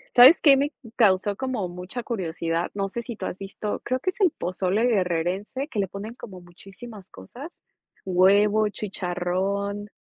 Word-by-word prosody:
¿Sabes 255 +7 +9
qué 280 -3 +7
me 285 +2 0 0.2
causó 200 -3 +3
como 245 -5 -3
mucha 180 +7 -7
curiosidad? 170 -5 -2
No 195 -1 -2
sé 235 - -4
si 235 -1 -7
tú 190 - -6
has 185 - -4
visto 200 +1 -5
creo 255 +1 -1
que 370 - -1
es 410 - -12
el 360 -5 +5
pozole 185 +4 -1
guerrerense 195 - -1
que 220 - -4
le 195 - +1
ponen 200 +5 -7
como 190 -7 -10
muchísimas 195 +4 -12
cosas, 250 - -11 0.5
huevo, 205 +3 +4
chicharrón. 200 +1 -3
200 Hz, 160 wpm, -25 LUFS, 185-235 Hz, 0.5 s, Sabes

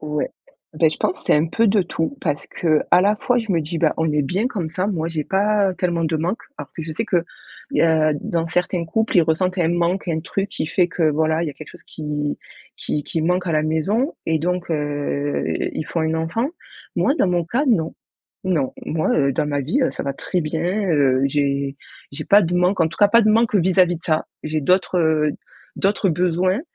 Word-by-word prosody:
Ouais. 150 -1 -2 0.5
Bah, 160 +1 +4
je 155 - -4
pense - - 0
c'est - - +5
un 150 +2 +3
peu 230 +7 +1
de 205 -1 +3
tout, 175 +8 -3
parce 145 -4 -2
qu'à 160 +1 +2
la 205 +3 +3
fois 245 +4 +1
je 225 -3 -3
me 170 -3 +2
dis: 160 +2 -4
«Bah, 160 -3 +2
on 160 -1 +1
est 150 - +2
bien 185 - 0
comme 190 -11 -3
ça. 185 +4 -2
Moi 165 -5 -1
j'ai 155 -3 -3
pas 200 0 +2
tellement 170 -2 -1
de 160 0 0
manque». 175 +8 -2 0.2
Alors - - -7
que 160 - -5
je 160 0 -5
sais 190 - -2
qu’il 175 -2 +1 0.5
y - - +2
a 160 -2 +3
dans 165 -1 -2
certains 180 0 0
couples, 220 +6 0
ils 175 - +7
ressentent 180 +4 0
un 165 -2 +2
manque, 175 +2 0
un 160 -1 0
truc 195 +4 -3
qui - - -3
fait 175 +3 +2
que, 170 -1 -1
voilà, 160 +2 +1
il 170 - -1
y - - -2
a - - -13
quelque 155 - -11
chose - - -14
qui 150 -1 -4 0.4
qui 150 - -2
qui 160 - -2
manque 180 +2 0
à 165 - 0
la 155 0 +2
maison 195 - 0
et 160 -1 +2
donc 180 +2 -2
heu, 145 -1 -1 0.3
ils 155 - -4
font 165 0 -2
un 160 0 0
enfant. 165 +10 -1 0.5
Moi 275 - +2
dans 195 - +3
mon 175 -1 +1
cas 240 - 0
non. 170 -11 +1 0.5
Non. 165 -8 0
Moi, 160 0 0
heu, 140 -1 +2
dans 145 - 0
ma 145 -1 -1
vie, 160 - 0
heu, 255 - +2
ça - - -5
va 140 - -1
très 180 +5 -2
bien, 160 +1 -2 0.3
heu. 135 -4 +3
J'ai 140 -1 -1 0.4
j'ai - - -5
pas 205 +1 +6
de 175 0 -1
manque 180 +1 +2
en 160 - +4
tout 165 - -11
cas, 205 -1 +6
pas 230 +2 +5
de 215 - +4
manque 225 0 +2
vis-à-vis 180 -2 +3
de 170 - -15
ça, 155 -2 0 0.2
j'ai 155 0 -2
d'autres, 180 +4 +2
heu, 155 -2 +2 0.4
d'autres 195 -1 +1
besoins 180 +4 +1
165 Hz, 230 wpm, -21 LUFS, 155-185 Hz, 0.5 s, ils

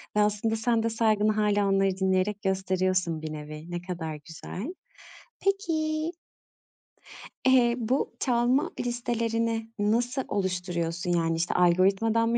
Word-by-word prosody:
ve - - +3
aslında 210 +2 +1
sen 225 0 +1
de 230 - +1
saygını 215 -1 +2
hâlâ 205 -1 +2
onları 195 -1 +2
dinleyerek 190 +2 +1
gösteriyorsun 185 -3 0
bir 155 -1 -5
nevi. 155 +2 -8
Ne 175 0 -3
kadar 170 -4 -5
güzel. 190 - -7 0.7
Peki 320 -5 0 1.4
eee, 245 -2 +5
bu 245 +4 0
çalma 245 +2 +2
listelerini 230 -2 -1
nasıl 240 +5 +1
oluşturuyorsun? 180 -3 -2
Yani, 165 -1 +1
işte, 170 +2 0
algoritmadan 195 +6 +3
mı 235 - +2
210 Hz, 120 wpm, -27 LUFS, 180-235 Hz, 1.4 s, eee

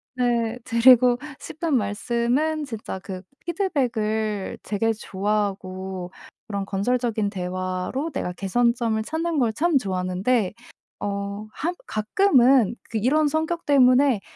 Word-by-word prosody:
네 240 -2 0
드리고 245 +1 +6 0.2
싶은 325 -1 -4
말씀은 240 +8 0
진짜 225 -6 -6
그 185 -1 -7 0.2
피드백을 220 - -1
되게 220 +2 0
좋아하고 190 -3 -3 0.4
그런 200 -2 -3
건설적인 220 +1 0
대화로 185 - -3
내가 180 -10 -3
개선점을 230 +3 +1
찾는 325 +1 -1
걸 235 -4 +2
참 330 +4 +2
좋아하는데 190 +1 0 0.5
어 200 0 -3 0.2
한 345 +4 -2
가끔은 250 - +3
그 225 - -2
이런 290 +8 +2
성격 320 +3 -1
때문에 260 -4 +5
230 Hz, 245 characters per minute, -24 LUFS, 200-270 Hz, 0.5 s, 드리고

